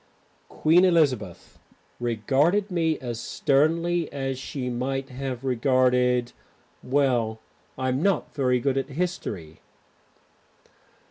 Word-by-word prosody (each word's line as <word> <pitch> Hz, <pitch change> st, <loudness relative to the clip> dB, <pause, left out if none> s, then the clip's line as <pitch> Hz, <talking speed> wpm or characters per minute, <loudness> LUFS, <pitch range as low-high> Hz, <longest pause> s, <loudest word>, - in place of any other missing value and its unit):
Queen 165 Hz, +4 st, +3 dB
Elizabeth 135 Hz, -, +1 dB, 0.4 s
regarded 140 Hz, -, +1 dB
me 165 Hz, -3 st, +1 dB
as 120 Hz, -3 st, -5 dB
sternly 165 Hz, +6 st, +1 dB
as 135 Hz, -2 st, -3 dB
she 130 Hz, -1 st, -5 dB
might 135 Hz, +2 st, -3 dB
have 130 Hz, -1 st, -5 dB
regarded 125 Hz, -1 st, +2 dB, 0.5 s
Well, 125 Hz, -5 st, +1 dB, 0.4 s
I'm 130 Hz, +1 st, -1 dB
not 195 Hz, +1 st, 0 dB
very 125 Hz, -3 st, +1 dB
good 135 Hz, +1 st, 0 dB
at 135 Hz, -, -5 dB
history. 135 Hz, -, -4 dB
135 Hz, 95 wpm, -25 LUFS, 125-155 Hz, 0.5 s, Queen